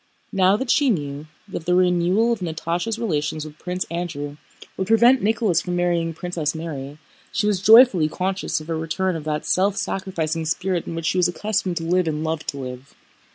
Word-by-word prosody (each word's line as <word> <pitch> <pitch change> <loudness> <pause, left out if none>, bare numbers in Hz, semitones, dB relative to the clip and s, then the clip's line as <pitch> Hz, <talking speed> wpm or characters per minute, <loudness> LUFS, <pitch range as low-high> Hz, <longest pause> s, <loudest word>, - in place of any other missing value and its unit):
Now 190 +1 +4
that 245 +1 -1
she 285 -3 +3
knew 145 -6 -2 0.2
that 175 -4 -7
the 180 - +3
renewal 180 +5 +3
of 230 - -4
Natásha's 175 +5 -2
relations 155 -8 -2
with 155 0 -11
Prince 180 +1 -3
Andrew 155 -4 -4 0.4
would 190 - -3
prevent 235 +4 +5
Nicholas 210 -5 +2
from 180 -1 -3
marrying 175 -2 +1
Princess 165 -2 -3
Mary, 145 -3 -6 0.3
she 205 - 0
was 205 -3 +1
joyfully 215 -7 +7
conscious 185 -1 -2
of 155 - -11
a - - 0
return 165 +3 -1
of 155 -2 -6
that 150 -1 -2
self 195 +2 +1
sacrificing 165 -4 -2
spirit 180 +2 -1
in 165 - -4
which 165 -1 -4
she 185 - +1
was 175 - +4
accustomed 190 -1 -2
to 165 - -3
live 180 +1 +1
and 155 0 -2
loved 160 0 -3
to 140 - -3
live. 130 0 -8
175 Hz, 195 wpm, -22 LUFS, 155-195 Hz, 0.4 s, joyfully